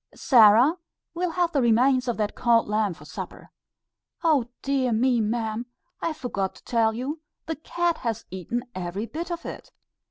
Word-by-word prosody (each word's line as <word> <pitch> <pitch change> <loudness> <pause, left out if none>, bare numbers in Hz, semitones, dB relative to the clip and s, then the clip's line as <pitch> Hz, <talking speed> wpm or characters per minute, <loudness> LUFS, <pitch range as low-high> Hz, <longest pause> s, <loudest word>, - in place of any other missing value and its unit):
"Sarah, 240 - +6 0.4
we'll 355 +1 -1
have 345 0 0
the 285 - +1
remains 250 +2 +3
of 240 - -1
that 210 -1 -1
cold 235 -1 +3
lamb 210 -3 0
for - - -15
supper." - - -8 0.7
"Oh! 305 -7 +3 0.2
dear 270 -3 +1
me, 240 +1 +2
ma'am; 220 +1 -2 0.3
I 335 - 0
forgot 240 -11 -3
to - - -17
tell 225 -2 +1
you, 280 +6 -4 0.2
the 320 - -3
cat 340 +2 -1
has 230 -4 -3
eaten 190 +7 -3
every 185 +3 -4
bit 330 +8 -6
of 340 -1 -5
it. - - -8
240 Hz, 165 wpm, -25 LUFS, 220-300 Hz, 0.7 s, Sarah